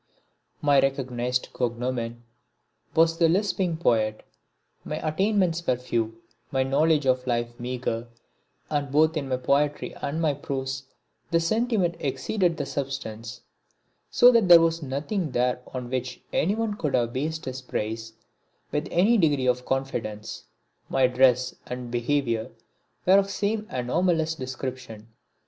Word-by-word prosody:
My 145 -2 +5
recognised 125 -2 -1
cognomen 120 -1 -2 0.7
was 165 +1 +4
the 165 -1 +5
Lisping 185 -2 +1
Poet. 110 -8 +1 0.6
My - - -4
attainments 180 0 +1
were 125 - +3
few, 115 -2 -3 0.3
my 130 -1 +1
knowledge 145 +2 +2
of 130 0 +1
life 120 -1 0
meagre, 120 -1 -3 0.6
and 145 -2 -1
both 155 +3 +4
in 140 -3 -2
my 130 - +1
poetry 145 +3 0
and 145 +3 -2
my 155 -3 +2
prose 135 -1 -4 0.4
the 165 - +3
sentiment 195 -1 +1
exceeded 165 +6 0
the 145 - -2
substance. 135 -5 -5 0.7
So 245 +1 +7
that 230 -5 +4
there 175 -1 +10
was 165 0 +1
nothing 150 +4 -3
there 125 0 +1
on 125 -1 -6
which 125 -1 -3
anyone 210 +4 0
could 150 -8 0
have 120 -1 +1
based 155 +4 -3
his 130 0 -5
praise 110 -2 -4 0.6
with 150 - -1
any 210 +6 +4
degree 145 -6 +2
of 125 0 +1
confidence. 120 -6 -3 0.4
My 135 -1 +3
dress 125 0 +3
and 125 -1 -6
behaviour 120 -2 0 0.6
were 190 +2 +7
of 195 - +1
the 195 - -7
same 210 +2 -1
anomalous 160 +6 +1
description. 130 -5 -6
135 Hz, 135 wpm, -26 LUFS, 125-165 Hz, 0.7 s, there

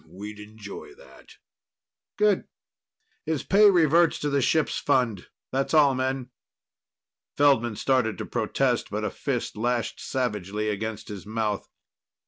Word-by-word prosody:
We'd 105 +5 -9
enjoy 105 -1 -10
that." - - -17 0.8
"Good. 210 -2 +2 0.8
His 160 -2 -2
pay 205 +2 +6
reverts 170 -2 +4
to 145 - -1
the 140 -1 +2
ship's 155 +4 +1
fund. 125 -9 0 0.2
That's 135 +4 0
all, 145 -3 +6
men." 130 0 -2 1.1
Feldman 125 -6 +3
started 125 -2 +1
to - - -5
protest, - - 0
but - - -3
a - - -2
fist - - -3
lashed 120 +1 -1
savagely 105 -5 -2
against 105 +1 -4
his 100 -1 -8
mouth. 110 -2 -2
125 Hz, 125 wpm, -26 LUFS, 105-145 Hz, 1.1 s, pay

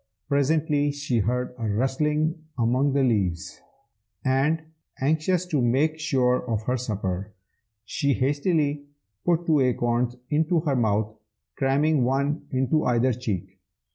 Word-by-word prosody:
Presently 145 0 +2
she 145 -4 -1
heard 125 +4 -1
a 110 -2 -2
rustling 150 +8 0
among 130 +4 +2
the 140 -1 +2
leaves, 95 -9 -1 0.6
and, 140 +5 +2 0.4
anxious 160 +6 +1
to 155 -7 0
make 140 +7 +1
sure 125 -5 +1
of 110 -2 -1
her 125 +3 0
supper, 100 -4 -3 0.5
she 140 +5 0
hastily 145 +1 0 0.4
put 175 -1 +1
two 155 -3 +3
acorns 120 -1 +1 0.2
into 160 +2 +2
her 145 -4 0
mouth, 110 -2 +1 0.4
cramming 140 +1 +2
one 140 +4 0
into 135 +4 +1
either 125 +1 +2
cheek. 95 -6 -4
135 Hz, 125 wpm, -25 LUFS, 120-150 Hz, 0.6 s, two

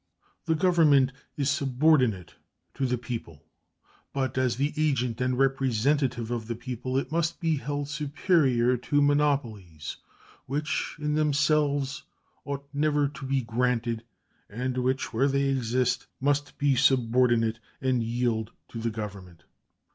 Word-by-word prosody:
The 165 -1 +2
Government 155 -7 +4 0.3
is 140 -2 0
subordinate 130 - +2 0.4
to 135 -1 -1
the 125 0 0
people; 115 - -7 0.7
but, 130 -2 -1
as 130 -2 +1
the 140 +4 -1
agent 130 -7 0
and 125 0 0
representative 135 -2 +1
of 115 -2 -3
the 115 - -3
people, 130 +2 -4
it 135 0 -2
must 170 0 0
be 165 -4 +1
held 145 +2 -3
superior 140 -4 +2
to 135 +4 0
monopolies, 135 - 0 0.5
which 150 +4 -2
in 150 0 -1
themselves 150 -2 +1 0.4
ought 140 0 -5
never 145 0 +2
to 140 -1 -9
be 135 -1 0
granted, 115 -1 -1 0.5
and 125 +4 -3
which, 130 +1 -1
where 130 +5 +3
they 140 0 +1
exist, 125 -2 0
must 145 +1 0
be 140 -1 +2
subordinate 120 -3 +3 0.2
and 130 -2 +1
yield 115 -1 -1 0.2
to 115 - -6
the 115 +1 -1
Government. 100 -6 -7
130 Hz, 130 wpm, -27 LUFS, 120-145 Hz, 0.7 s, Government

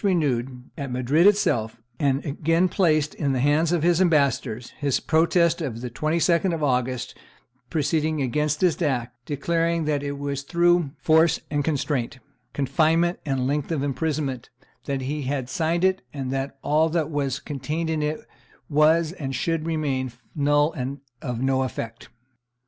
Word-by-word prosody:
renewed, 135 -9 0 0.2
at 140 -1 -4
Madrid 130 +8 +3
itself, 120 - +2 0.2
and 140 -1 +1
again 165 +5 +1
placed 155 -6 +2
in 140 -3 -1
the 130 - 0
hands 150 +5 +2
of 170 -3 +1
his 175 +1 +3
ambassadors, 140 -8 +1
his 140 -3 +1
protest 170 +1 +2
of 120 -7 -4
the 125 -1 -5
22d 170 +6 +1
of 155 - -4
August 125 -2 0 0.6
preceding 155 0 0
against 150 +3 0
this 180 -2 +2
act, 125 -6 -1
declaring 165 +3 0
"that 150 -2 0
it 140 0 -3
was 140 -1 -3
through 170 +1 +2
force 160 +2 +3
and 145 -1 0
constraint, 140 -4 -1 0.3
confinement 160 +5 +1
and 135 -2 0
length 145 +3 -1
of 150 -4 -1
imprisonment, 140 -2 -2 0.4
that 135 -1 -2
he 145 +3 -3
had 135 -1 -2
signed 165 +6 0
it, 190 0 +2
and 135 -3 -4
that 135 +1 -3
all 155 +2 +3
that 160 -1 -1
was 140 -3 -1
contained 150 +3 -4
in 160 -1 -1
it 150 +1 -1 0.5
was 155 +2 +4
and 135 -7 -5
should 165 +1 -1
remain 140 -6 -1 0.2
null 145 +1 +2
and 135 +2 -4 0.2
of 125 -2 -3
no 130 0 +2
effect." 115 -3 -5
145 Hz, 155 wpm, -24 LUFS, 135-160 Hz, 0.6 s, was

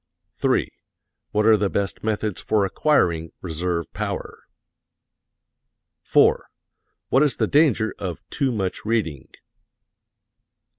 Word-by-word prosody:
3. - - +1 0.6
What 105 0 +1
are 110 0 +7
the 100 -1 0
best 100 -1 -2
methods 110 -2 -2
for 105 -2 +1
acquiring 85 - +1
reserve 85 0 -3
power? - - -5 1.6
4. - - +3 0.6
What 135 - +4
is 145 -5 +3
the - - +1
danger 140 -8 +3
of 90 -4 -6
too 140 -3 0
much 95 -5 -3
reading? 90 - -1
105 Hz, 105 wpm, -23 LUFS, 90-115 Hz, 1.6 s, are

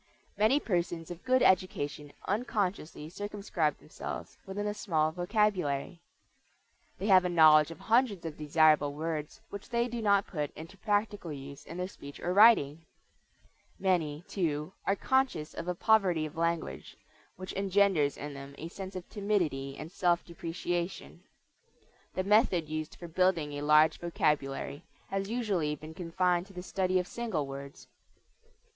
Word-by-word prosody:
Many 215 +8 +4
persons 175 - -2
of 175 0 -8
good 255 0 +3
education 150 -6 +1 0.2
unconsciously 195 -8 -2
circumscribe 195 -4 -2
themselves - - -7
within 205 +2 -3
a 210 - -1
small 160 -7 0
vocabulary. 180 -4 0 1.0
They 195 - -4
have 190 -3 +6
a 180 - 0
knowledge 155 -3 +7
of 165 - -10
hundreds 225 -6 +2
of 160 -2 -4
desirable 150 -1 +3
words 155 -1 -4
which 200 0 -8
they 235 0 +1
do 235 -1 -4
not 200 -2 +3
put 150 -4 -3
into 165 +5 -9
practical 205 -3 -1
use 140 -1 -8
in 170 - -7
their 180 0 -2
speech 140 -6 -11
or 180 - -1
writing. 185 -8 +6 0.9
Many, 165 -5 0
too, 155 -2 -2
are 195 - +3
conscious 265 - 0
of 170 - -6
a 180 - -1
poverty 185 -6 +3
of 155 +2 -8
language, 165 - -2 0.4
which 185 +1 -7
engenders 195 -6 +2
in 145 0 -6
them 140 0 -9
a 165 - -6
sense 190 +1 -8
of 180 -1 -6
timidity 175 -11 -1
and 155 +2 -8
self 175 -1 +1
depreciation. 170 +1 -4 0.9
The 185 - 0
method 195 -5 +3
used 155 0 -4
for 175 - -9
building 170 -3 +1
a 145 - -4
large 150 +2 +5
vocabulary 150 -4 -1 0.3
has 195 0 -2
usually 200 -11 0
been 155 +2 -10
confined 180 +1 0
to 195 - -15
the 180 -1 -7
study 185 0 0
of 180 - +1
single 195 -8 -3
words. 140 0 -9
175 Hz, 150 wpm, -30 LUFS, 155-200 Hz, 1.0 s, knowledge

